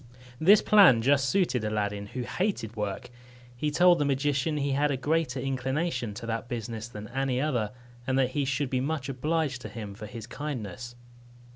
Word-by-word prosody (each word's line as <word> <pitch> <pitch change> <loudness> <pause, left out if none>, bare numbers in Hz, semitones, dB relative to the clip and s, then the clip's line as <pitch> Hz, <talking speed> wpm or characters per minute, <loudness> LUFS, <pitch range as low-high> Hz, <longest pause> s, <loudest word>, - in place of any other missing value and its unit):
This 195 +6 +6
plan 190 - +6
just 140 0 +3
suited 130 - +1
Aladdin, 105 -1 -2
who 125 +4 -5
hated 150 - -2
work. 105 +1 -4 0.4
He 150 +5 -1
told 175 +3 +5
the - - +2
magician 145 +2 0
he 140 -1 0
had 145 +2 +2
a 140 - 0
greater 145 0 0
inclination 130 -2 -2
to 115 +2 -7
that 115 0 -3
business 115 -1 -4
than 105 -3 -8
to 120 - -13
any 135 -2 0
other, 125 -8 0 0.4
and 130 0 +1
that 130 -1 +2
he 145 +1 0
should 135 0 -1
be 130 -1 +1
much 140 -1 -2
obliged 145 0 -1
to - - -7
him 105 -4 -7
for 105 +1 -8
his 115 0 -8
kindness. 120 -4 -6
130 Hz, 185 wpm, -28 LUFS, 115-145 Hz, 0.4 s, This